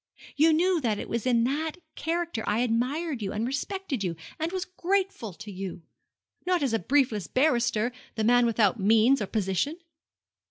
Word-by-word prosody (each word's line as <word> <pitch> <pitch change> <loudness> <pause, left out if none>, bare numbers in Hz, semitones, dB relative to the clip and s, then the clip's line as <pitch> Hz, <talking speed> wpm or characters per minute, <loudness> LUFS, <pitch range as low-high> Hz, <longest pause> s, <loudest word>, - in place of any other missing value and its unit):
You 315 +3 +5
knew 345 +2 +2
that 220 -5 0
it - - -5
was 235 +2 -2
in 235 -2 +3
that 300 +6 -1 0.2
character 335 -8 -2
I 215 +3 +1
admired 250 +4 -1
you 195 -2 -2
and 215 +2 -1
respected 280 - -3
you, 175 -3 -2 0.2
and 320 +2 -1
was 375 0 -2
grateful 370 - -1
to 205 +4 -9
you! 185 -2 -6 0.6
Not 360 -4 +1
as 270 - +1
the 225 - +1
briefless 230 - +1
barrister 240 -4 +2 0.2
the 220 - -1
man 245 +1 +5
without 220 -1 +2
means 225 +6 +4
or 205 - -2
position!' 210 - -1
245 Hz, 170 wpm, -27 LUFS, 215-315 Hz, 0.6 s, You